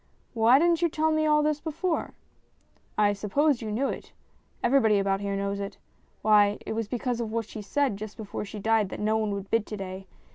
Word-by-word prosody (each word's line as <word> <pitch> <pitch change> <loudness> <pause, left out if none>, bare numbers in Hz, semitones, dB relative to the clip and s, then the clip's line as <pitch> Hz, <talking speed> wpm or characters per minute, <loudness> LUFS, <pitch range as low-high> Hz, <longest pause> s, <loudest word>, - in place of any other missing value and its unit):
" - - -38
Why 235 +2 +5
didn't 335 +2 +3
you 340 - +3
tell 315 +1 +1
me 310 0 +2
all 300 0 +4
this 300 -1 0
before? 325 +2 -2 0.3
" - - -40
" - - -37
I 205 - +2
supposed 245 +8 +1
you 220 -2 -4
knew 255 +6 0
it. - - -7 0.5
Everybody 225 -5 +4
about 195 0 0
here 200 0 -2
knows 200 0 -2
it. 200 0 -5 0.5
Why, 210 -1 +5
it - - -3
was 225 -1 -2
because 240 +1 -2
of 220 -2 -4
what 230 0 -1
she 215 - -7
said 260 +1 0
just 210 0 -8
before 210 -2 -5
she 210 +1 -8
died 220 -1 +2
that - - -7
no 215 +1 +1
one 220 -1 0
would 195 0 -7
bid 225 -1 +1
to 210 - -5
day. 190 0 -7
220 Hz, 230 wpm, -27 LUFS, 205-280 Hz, 0.5 s, Why